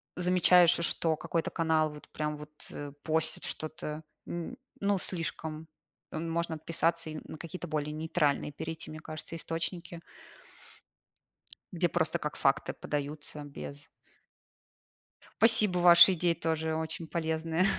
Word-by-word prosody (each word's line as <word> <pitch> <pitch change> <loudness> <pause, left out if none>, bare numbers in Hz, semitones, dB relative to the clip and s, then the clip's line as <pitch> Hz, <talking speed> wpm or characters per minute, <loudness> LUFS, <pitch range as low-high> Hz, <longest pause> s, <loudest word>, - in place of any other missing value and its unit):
замечаешь, 180 -1 +6
что 170 -1 +2
какой-то 165 +2 -2
канал 160 -1 +2
вот 150 0 -12
прям 150 0 -3
вот, 150 0 -10 0.2
э, 145 -1 -6
постит 160 0 0
что-то, 155 0 -4 0.2
м, 175 +9 -5 0.2
ну, 200 0 +2
слишком, 160 -3 -3 0.4
можно 165 +1 -2
отписаться 165 +1 -1
и 155 0 -5
на - - -8
какие-то 175 +2 -7
более 150 -1 -2
нейтральные 150 -2 0
перейти, 160 +2 -6
мне 155 - -7
кажется, 155 +1 -7
источники 165 +1 -4 1.7
где 175 0 +1
просто 170 0 +2
как 150 -1 -4
факты 135 - +1
подаются 150 0 -4
без 145 0 -8 1.5
Спасибо, 220 -5 +6
ваши 175 +1 +9
идеи 175 0 +2
тоже 160 -1 -1
очень 160 +1 -4
полезные. 160 +1 0
160 Hz, 120 wpm, -30 LUFS, 155-170 Hz, 1.7 s, ваши